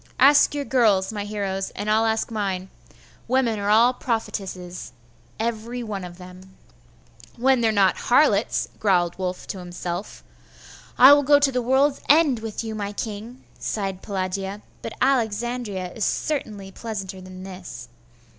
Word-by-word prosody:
Ask 285 Hz, +2 st, +6 dB
your 285 Hz, -1 st, -2 dB
girls, 220 Hz, -7 st, +2 dB
my 205 Hz, -1 st, -4 dB
heroes, 195 Hz, -2 st, -3 dB
and 205 Hz, -, -4 dB
I'll 220 Hz, +1 st, +3 dB
ask 220 Hz, +1 st, -1 dB
mine. 190 Hz, -4 st, -3 dB, 0.6 s
Women 240 Hz, -3 st, +1 dB
are 200 Hz, 0 st, -1 dB
all 230 Hz, +4 st, +5 dB
prophetesses, 190 Hz, -7 st, -4 dB, 0.5 s
every 235 Hz, +2 st, -3 dB
one 205 Hz, -4 st, -5 dB
of 175 Hz, -1 st, -9 dB
them.' 185 Hz, +1 st, -13 dB, 0.8 s
'When 260 Hz, +1 st, +3 dB
they 230 Hz, -, +3 dB
are -, -, +3 dB
not 195 Hz, -3 st, +3 dB
harlots,' 240 Hz, -5 st, +2 dB
growled 180 Hz, -4 st, +2 dB
Wulf 180 Hz, -1 st, -3 dB
to 190 Hz, -, -6 dB
himself. 175 Hz, +1 st, -6 dB, 0.7 s
'I 265 Hz, +3 st, +10 dB
will 290 Hz, -, +5 dB
go 285 Hz, +1 st, +5 dB
to 285 Hz, -1 st, +2 dB
the 250 Hz, -1 st, 0 dB
world's 265 Hz, +4 st, +2 dB
end 295 Hz, -5 st, +5 dB
with 220 Hz, 0 st, -5 dB
you, 220 Hz, -1 st, -5 dB
my 205 Hz, -1 st, -4 dB
king!' 220 Hz, +4 st, -6 dB, 0.2 s
sighed 195 Hz, -3 st, -3 dB
Pelagia; 195 Hz, +1 st, -4 dB, 0.2 s
'but 225 Hz, -, -6 dB
Alexandria 230 Hz, -6 st, -1 dB
is 225 Hz, -, -4 dB
certainly 210 Hz, -11 st, -2 dB
pleasanter 195 Hz, -3 st, -6 dB
than 185 Hz, 0 st, -10 dB
this. 180 Hz, -11 st, -9 dB
210 Hz, 150 wpm, -23 LUFS, 190-240 Hz, 0.8 s, I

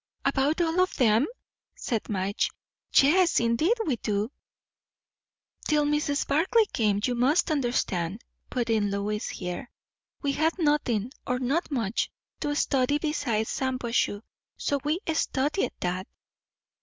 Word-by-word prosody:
"About 295 Hz, +5 st, +2 dB
all 335 Hz, +1 st, +1 dB
of 370 Hz, -, +1 dB
them?" 230 Hz, +1 st, +4 dB, 0.5 s
said 230 Hz, -5 st, -3 dB
Madge. 200 Hz, 0 st, 0 dB, 0.5 s
"Yes, 340 Hz, +5 st, +5 dB
indeed 235 Hz, -, +2 dB
we 275 Hz, -7 st, 0 dB
do." 210 Hz, +2 st, -1 dB, 1.4 s
"Till 300 Hz, -1 st, +3 dB
Mrs. 295 Hz, -1 st, 0 dB
Barclay 370 Hz, +10 st, +3 dB
came, 210 Hz, -3 st, +2 dB
you 250 Hz, -, +1 dB
must 275 Hz, +8 st, +2 dB
understand," 230 Hz, -, -1 dB, 0.3 s
put 240 Hz, -3 st, -1 dB
in 210 Hz, -2 st, +2 dB
Lois 205 Hz, +1 st, -2 dB
here, 180 Hz, +5 st, -5 dB, 0.5 s
"we 285 Hz, -, +2 dB
had 315 Hz, +5 st, +1 dB
nothing, 270 Hz, -, +1 dB, 0.2 s
or 250 Hz, -, +1 dB
not 270 Hz, +7 st, 0 dB
much, 230 Hz, -7 st, -1 dB, 0.3 s
to 290 Hz, 0 st, -1 dB
study 275 Hz, 0 st, +2 dB
besides 280 Hz, -8 st, -1 dB
Shampuashuh; 245 Hz, -5 st, 0 dB, 0.3 s
so 285 Hz, -, 0 dB
we 305 Hz, +4 st, 0 dB
studied 300 Hz, +2 st, 0 dB
that." 180 Hz, +2 st, -2 dB
260 Hz, 125 wpm, -27 LUFS, 215-300 Hz, 1.4 s, Yes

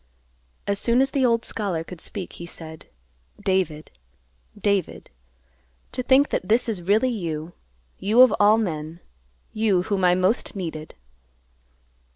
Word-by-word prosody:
As 200 Hz, 0 st, -1 dB
soon 235 Hz, +3 st, +2 dB
as 270 Hz, 0 st, +2 dB
the 275 Hz, -, +1 dB
old 230 Hz, -2 st, +2 dB
scholar 190 Hz, -7 st, -2 dB
could 175 Hz, 0 st, -11 dB
speak, 195 Hz, -4 st, -5 dB
he 170 Hz, -, -9 dB
said, 160 Hz, -2 st, -10 dB, 0.5 s
"David, 180 Hz, -6 st, -1 dB, 0.7 s
David! 200 Hz, -2 st, -1 dB, 0.8 s
To -, -, -3 dB
think 265 Hz, +3 st, +4 dB
that 185 Hz, -, -3 dB
this 230 Hz, +3 st, +3 dB
is 210 Hz, -6 st, -2 dB
really 215 Hz, +8 st, +2 dB
you. 165 Hz, -6 st, -4 dB, 0.5 s
You 220 Hz, +6 st, +6 dB
of 255 Hz, -, +5 dB
all 210 Hz, +1 st, +6 dB
men; 160 Hz, -6 st, -3 dB, 0.5 s
you, 210 Hz, -5 st, +2 dB
whom 195 Hz, -1 st, -1 dB
I 180 Hz, 0 st, +5 dB
most 185 Hz, +7 st, 0 dB
needed." 160 Hz, -5 st, -6 dB
195 Hz, 140 wpm, -24 LUFS, 170-225 Hz, 0.8 s, You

